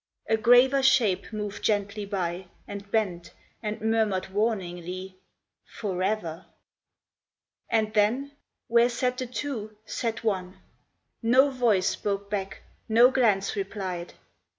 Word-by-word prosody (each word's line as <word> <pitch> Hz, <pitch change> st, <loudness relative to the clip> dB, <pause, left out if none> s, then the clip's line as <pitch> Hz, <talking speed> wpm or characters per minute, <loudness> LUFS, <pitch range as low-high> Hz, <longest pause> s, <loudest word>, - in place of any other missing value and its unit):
A 220 Hz, -, +3 dB
graver 245 Hz, +4 st, +5 dB
shape 240 Hz, -9 st, +3 dB
moved 210 Hz, -2 st, -5 dB
gently 205 Hz, 0 st, 0 dB
by, 180 Hz, -2 st, -3 dB, 0.2 s
And 200 Hz, 0 st, -8 dB
bent, 190 Hz, -6 st, -1 dB, 0.3 s
and 215 Hz, 0 st, -3 dB
murmured 220 Hz, -4 st, +1 dB
warningly, 185 Hz, -3 st, -2 dB, 0.5 s
"Forever! 190 Hz, -4 st, -3 dB, 0.6 s
" -, -, -55 dB
And 220 Hz, -1 st, +1 dB
then 230 Hz, +7 st, +2 dB, 0.4 s
where 235 Hz, +1 st, +4 dB
sat 250 Hz, +1 st, -1 dB
the 255 Hz, -, -3 dB
two, 225 Hz, -4 st, -5 dB
sat 225 Hz, 0 st, -3 dB
one! 190 Hz, -4 st, -2 dB, 0.6 s
No 260 Hz, +4 st, +5 dB
voice 230 Hz, -8 st, +2 dB
spoke 200 Hz, 0 st, -3 dB
back, 195 Hz, -2 st, -4 dB, 0.3 s
no 235 Hz, +3 st, +6 dB
glance 215 Hz, -7 st, +2 dB
replied. 190 Hz, -3 st, -4 dB
210 Hz, 115 wpm, -27 LUFS, 190-235 Hz, 0.6 s, no